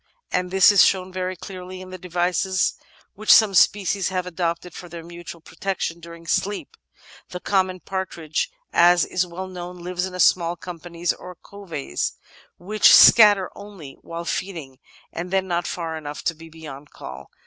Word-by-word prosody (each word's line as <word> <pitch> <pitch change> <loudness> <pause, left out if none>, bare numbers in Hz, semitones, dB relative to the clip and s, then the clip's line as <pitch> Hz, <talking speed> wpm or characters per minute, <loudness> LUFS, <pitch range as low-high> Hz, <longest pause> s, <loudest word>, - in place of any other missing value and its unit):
And 180 0 -1
this 190 +2 +6
is 200 - +7
shown 185 -1 +1
very 185 0 -3
clearly 185 0 -9
in 185 0 -10
the 185 - -7
devices 180 +1 0 0.4
which 215 +2 +1
some 215 -3 +7
species 195 0 +3
have 185 -1 -2
adopted 175 0 -3
for 175 - -10
their 170 0 -8
mutual 170 0 -10
protection 190 -2 -4
during 170 0 -12
sleep. 200 +4 -2 0.5
The 180 - -6
common 185 -1 0
partridge, 170 -4 -3 0.2
as 175 0 +5
is 185 0 -1
well 180 +2 -6
known, 180 -1 -8
lives 180 +1 -3
in 185 -1 -8
small 170 0 +3
companies, 170 0 -4
or 180 - -11
*coveys,' 170 - -5 0.4
which 210 +5 +4
scatter 205 -4 +7
only 190 -10 -11
while 170 0 -7
feeding, 165 -9 -5 0.3
and 175 +2 -5
then 190 0 0
not 175 -1 -1
far 165 -2 -4
enough 150 -2 -7
to 165 - 0
be 165 +1 -14
beyond 150 -3 -11
call. 65 +1 -10
180 Hz, 160 wpm, -23 LUFS, 170-185 Hz, 0.5 s, is